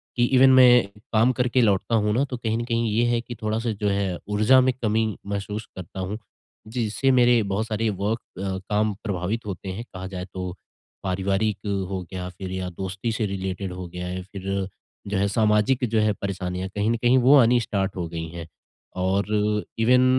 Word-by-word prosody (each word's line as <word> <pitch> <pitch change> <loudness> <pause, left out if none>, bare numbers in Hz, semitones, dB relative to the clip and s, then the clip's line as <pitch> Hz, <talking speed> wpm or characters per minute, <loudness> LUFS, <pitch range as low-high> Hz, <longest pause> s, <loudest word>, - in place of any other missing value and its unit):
कि 120 - +2
इवेन 130 +1 +7
मैं 125 -4 +7 0.3
काम 115 +4 +4
करके 125 0 +2
लौटता 105 +1 +2
हूँ 105 -1 +2
ना, 130 +4 +2
तो 130 -3 -5
कहीं 115 -1 -1
न 120 - -2
कहीं 115 -2 0
ये 115 +3 +2
है 120 -1 +2
कि 120 0 -8
थोड़ा-सा 110 +2 -1
जो 105 0 -2
है, 100 -3 0
ऊर्जा 110 +5 +5
में 130 0 +2
कमी 110 0 +2 0.2
महसूस 100 +1 -4
करता 95 +1 -8
हूँ। 95 +3 -3 0.5
जिससे 120 +3 0
मेरे 120 -1 +5
बहुत 110 +3 -1
सारे 110 0 0
वर्क 110 +3 0 0.2
अ, 95 -1 -2
काम 105 0 +1
प्रभावित 100 +3 -2
होते 95 -1 -5
हैं। 100 +5 -5
कहा 95 0 -6
जाए 90 -1 -6
तो, 90 -1 -4 0.5
पारिवारिक 95 +2 0 0.3
हो 95 -1 -3
गया, 90 -1 -5
फ़िर 95 +1 -7
या 95 -1 -3
दोस्ती 95 +5 -4
से 110 0 -1
रिलेटेड 95 -1 -3
हो 90 0 -6
गया 90 +1 -6
है 90 - -4
या 95 - -4
फ़िर 95 0 -4 0.4
जो 100 -1 -1
है, 100 - +2
सामाजिक 105 +4 +2
जो 110 0 +2
है 105 -1 +2
परेशानियाँ 95 -1 -3
कहीं 105 +1 +1
न - - +2
कहीं 120 +2 +4
वो 130 +3 +6
आनी 120 -1 +5
स्टार्ट 100 -3 -2
हो 90 -2 -3
गई 80 0 -5
हैं। 85 0 -8 0.5
और 95 +3 0
अ, 105 0 +1 0.2
इवेन 125 +2 +5
105 Hz, 200 wpm, -24 LUFS, 95-115 Hz, 0.5 s, इवेन